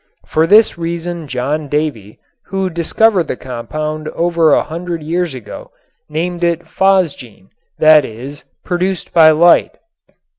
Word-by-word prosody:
For 160 +1 +1
this 210 -2 +4
reason 170 -1 -4
John 140 +4 -3
Davy, 140 -9 -3 0.3
who 190 -1 -3
discovered 175 +2 +1
the - - -3
compound 155 +5 -5
over 170 -1 +1
a - - +3
hundred 170 0 -6
years 170 -1 -2
ago, 125 - -10 0.4
named 175 +3 -3
it 170 -1 +1
phosgene, 160 - -1 0.3
that 155 -1 +6
is, 130 +5 -9 0.2
"produced 180 0 -3
by 160 -2 +7
light." 170 +2 +4
160 Hz, 125 wpm, -15 LUFS, 150-175 Hz, 0.4 s, by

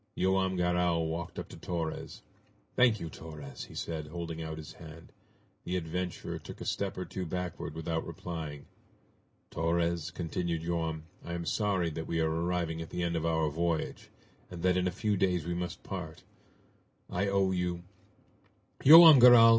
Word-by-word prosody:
Joam 95 0 +2
Garral 90 -2 +1
walked 85 +1 -5
up - - -5
to - - -10
Torres. 85 -3 -4 0.5
"Thank 120 -4 +4
you, 85 - -5
Torres!" 75 -5 -9
he - - -14
said, 80 -2 -4
holding 80 0 -5
out 80 -1 -5
his 80 -1 -9
hand. 80 0 -12 0.5
The 90 - -3
adventurer 90 +1 -4
took - - -10
a - - -6
step 100 -1 -2
or 90 - -3
two 95 +2 -5
backward 90 -3 -4
without 80 0 -2
replying. 80 -3 -6 0.9
"Torres," 85 0 0
continued 85 -1 -3
Joam, 80 -2 -2 0.2
"I 85 - -6
am 85 -1 -3
sorry 95 -1 0
that 80 +1 -5
we 85 - -1
are 80 -1 +2
arriving 85 0 -1
at 80 - -7
the 90 - -3
end 85 0 -1
of 85 0 0
our 80 -1 +2
voyage, 85 +1 -2 0.4
and 85 -2 -8
that 90 -1 +3
in 90 0 +1
a - - 0
few 105 +3 0
days 90 -4 +1
we 85 - -2
must 90 0 -4
part! - - -6 0.8
I 100 +3 -1
owe 100 -1 +2
you 90 -1 -1 0.5
" - - -25
"Joam 160 0 +11
Garral!" 120 -2 +9
85 Hz, 170 wpm, -31 LUFS, 80-90 Hz, 0.9 s, Joam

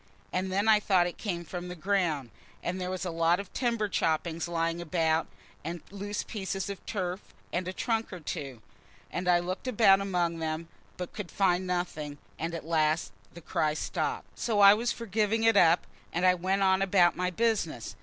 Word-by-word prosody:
And 185 +1 -1
then 200 +3 +1
I 215 -1 +7
thought 190 -4 +3
it 175 - -5
came 175 -5 -3
from 180 +2 -6
the 180 - -6
ground; 165 - 0 0.3
and 185 +2 -2
there 180 - -2
was 185 0 -3
a 180 - -2
lot 165 +2 +2
of 200 - -8
timber 235 -4 0
choppings 165 -2 0
lying 165 0 -1
about, 160 -1 +1 0.4
and 170 +2 -5
loose 205 +1 -4
pieces 195 -2 -3
of 200 - -9
turf, 185 -3 -2 0.3
and 180 +1 -1
a - - -1
trunk 225 +3 -1
or 180 - -6
two. 140 -8 -6 0.5
And 180 +1 -3
I 175 -1 +6
looked 185 +7 -4
about 205 -5 +5
among 175 -4 0
them, 160 +1 -3 0.3
but 180 -1 -6
could 205 -5 -6
find 185 -1 +1
nothing, 160 -5 -3 0.2
and 165 +1 -2
at 165 - -6
last 155 -6 +1 0.2
the 170 - -9
cry 155 -1 0
stopped. - - -3
So 220 -3 0
I 200 0 +10
was 235 +3 0
for 235 - -6
giving 215 +1 +1
it 225 -1 +5
up, 170 -3 +5 0.3
and 175 +2 0
I 185 - +7
went 190 +2 0
on 190 0 +4
about 185 -3 +4
my 180 +1 0
business. 190 - -1
180 Hz, 195 wpm, -29 LUFS, 165-200 Hz, 0.5 s, I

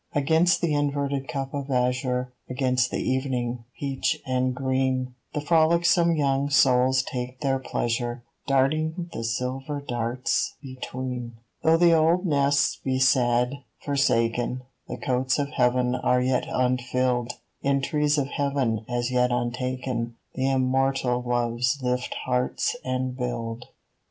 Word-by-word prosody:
Against 160 +5 +3
the 170 -4 +1
inverted 140 -2 -1
cup 135 -1 -4
of 140 -1 -4
azure, 125 0 0 0.2
Against 125 -1 +1
the - - -2
evening, 125 -3 -1
peach 140 +3 -1
and 130 0 0
green, 130 -1 0 0.2
The 150 - 0
frolicsome 170 +2 +3
young 140 -1 +1
souls 130 -2 +4
take 125 +1 -5
their 135 -2 +1
pleasure, 120 -1 -2 0.2
Darting 155 +5 +1
the 115 - -4
silver 130 +5 -3
stars 120 0 -1
between. 130 -2 -6 0.3
Though 160 +1 +4
the 170 0 +5
old 165 +4 +3
nests 140 -2 +2
be 130 -1 0
sad, 125 0 +3 0.3
forsaken, 125 -2 +1 0.2
The - - -5
cotes 130 0 0
of 140 -1 -1
Heaven 125 -2 +2
are 125 0 +2
yet 125 0 +1
unfilled: 125 -1 0 0.3
In 140 0 +2
trees 150 0 +1
of 140 - +1
Heaven 135 -7 0
as 120 0 -1
yet 125 0 +3
untaken 120 -1 -2 0.2
The 130 +1 0
immortal 130 -1 +1
Loves 120 +1 0
lift 125 0 -1
hearts 125 - 0
and 130 0 -2
build. 120 -2 -4
130 Hz, 130 wpm, -25 LUFS, 125-140 Hz, 0.3 s, the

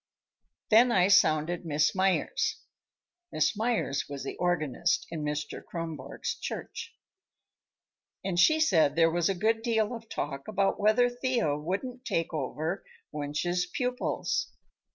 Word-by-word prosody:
Then 235 +3 +6
I 185 -3 +4
sounded 170 -2 +3
Miss 155 -1 +1
Meyers" 190 -1 +1 0.7
(Miss - - +1
Meyers 220 - 0
was 140 -2 -6
the 135 - -5
organist 175 -1 0
in 160 -2 -4
Mr. 150 0 -4
Kronborg's 165 -2 -5
church) - - -6 1.3
"and 180 -3 0
she 310 - +5
said 160 - +3
there 165 0 +4
was 175 +2 +1
a 195 - 0
good 225 +4 +1
deal 225 -1 +1
of 230 -1 -9
talk 140 -1 -4
about 200 -1 0
whether 215 +4 +4
Thea 245 - 0
wouldn't 200 - -4
take 165 -8 -1
over 155 +5 -3 0.3
Wunsch's 155 +5 -1
pupils. 250 +6 -1
180 Hz, 130 wpm, -29 LUFS, 155-220 Hz, 1.3 s, Then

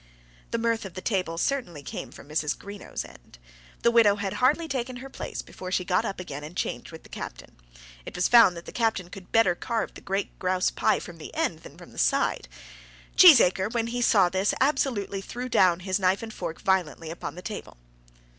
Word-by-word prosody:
The - - -1
mirth 230 0 0
of 190 -3 -9
the 185 - -5
table 185 -6 -1
certainly 175 - -2
came - - -6
from - - -13
Mrs. 150 0 -1
Greenow's 200 0 -7
end. - - -16 0.5
The 235 - +5
widow 225 -4 +5
had 200 -2 -3
hardly 300 +6 +3
taken 255 -3 -3
her 265 +2 -9
place - - -6
before 185 0 -8
she 180 -1 0
got 180 +1 +1
up 195 - -4
again 150 -5 -6
and 160 +5 -9
changed - - -3
with 160 - -11
the - - -15
captain. - - -8 0.5
It - - -9
was 180 - +2
found 225 -8 +7
that 170 - -9
the - - -8
captain 220 -7 -1
could 190 -2 -11
better 225 -6 +4
carve 230 +5 -3
the - - -12
great 195 +1 -3
grouse 185 0 +1
pie - - +2
from 170 -2 -10
the 155 - -8
end 325 +1 0
than - - -14
from - - -13
the - - -9
side. - - +1 0.7
Cheesacre, 220 - +7
when 230 -1 +1
he 245 - -1
saw 200 -6 +5
this, 190 +3 0
absolutely 240 -8 0
threw 245 +5 -6
down 185 -7 +3
his 185 +1 -1
knife 190 +2 +2
and 220 -1 -7
fork 170 -4 -5
violently 175 -5 0
upon 165 - -6
the 180 - -9
table. 210 - -7
195 Hz, 210 wpm, -26 LUFS, 180-230 Hz, 0.7 s, found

